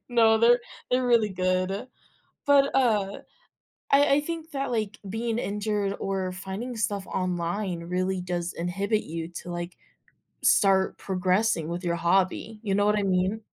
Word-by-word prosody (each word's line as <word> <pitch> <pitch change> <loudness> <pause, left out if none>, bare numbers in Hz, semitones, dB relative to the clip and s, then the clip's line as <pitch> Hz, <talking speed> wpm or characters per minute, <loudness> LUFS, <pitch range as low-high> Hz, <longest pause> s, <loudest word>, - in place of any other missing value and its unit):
No, 225 -2 +4
they're 240 +2 +5 0.3
they're 250 0 +2
really 230 -4 +3
good. 185 +4 -1 0.6
But, 280 -1 +4
uh, 210 -7 +1 0.7
I 280 0 +5
I 295 - +2
think 325 +1 -5
that, 275 -2 -2
like, 215 -2 -2
being 225 +2 -2
injured 205 -1 -1
or 190 -1 -2
finding 195 +7 -6
stuff 200 -1 -1
online 180 0 -2
really 185 +1 -1
does 175 -1 -3
inhibit 195 +5 -1
you 165 +1 -5 0.2
to, 175 - -7
like, 175 0 -5 0.7
start 190 -2 +4
progressing 185 -2 0
with 175 +2 -4
your 170 -1 0
hobby, 190 +5 0
you 200 -3 -1
know 205 0 +3
what 210 0 +3
I - - 0
mean? 190 +3 +1
195 Hz, 150 wpm, -26 LUFS, 185-225 Hz, 0.7 s, they're